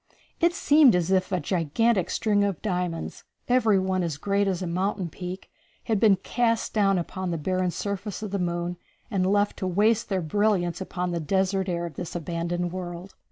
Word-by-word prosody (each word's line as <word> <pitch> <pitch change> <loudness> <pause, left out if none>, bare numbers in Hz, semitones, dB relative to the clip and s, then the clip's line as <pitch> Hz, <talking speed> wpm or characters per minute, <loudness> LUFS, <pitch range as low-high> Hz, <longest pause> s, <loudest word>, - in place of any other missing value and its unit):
It 340 +1 +3
seemed 295 - +5
as 180 +1 0
if 190 +1 +2
a 185 - +1
gigantic 185 +5 +1
string 205 -2 +1
of 200 -5 -1
diamonds, 180 -5 -3 0.2
every 230 -5 +4
one 190 0 0
as 165 -5 -2
great 200 +5 +1
as 185 -1 -1
a - - -2
mountain 185 +1 -1
peak, 180 +3 -7 0.3
had 220 -3 0
been 205 -2 +6
cast 230 +4 0
down 195 -3 +3
upon 185 +1 -3
the 170 - -1
barren 185 +3 0
surface 200 +3 -4
of 210 - -5
the 200 - -1
moon 175 0 -2 0.3
and 190 -1 +1
left 205 0 +1
to 185 - -2
waste 210 +6 +2
their 190 -3 0
brilliance 190 0 +1
upon 180 -1 -3
the 170 - -1
desert 190 +3 0
air 170 -1 -1
of 165 -5 -8
this 175 -1 -6
abandoned 175 +1 -2
world. 180 +1 -6
185 Hz, 190 wpm, -26 LUFS, 175-205 Hz, 0.3 s, been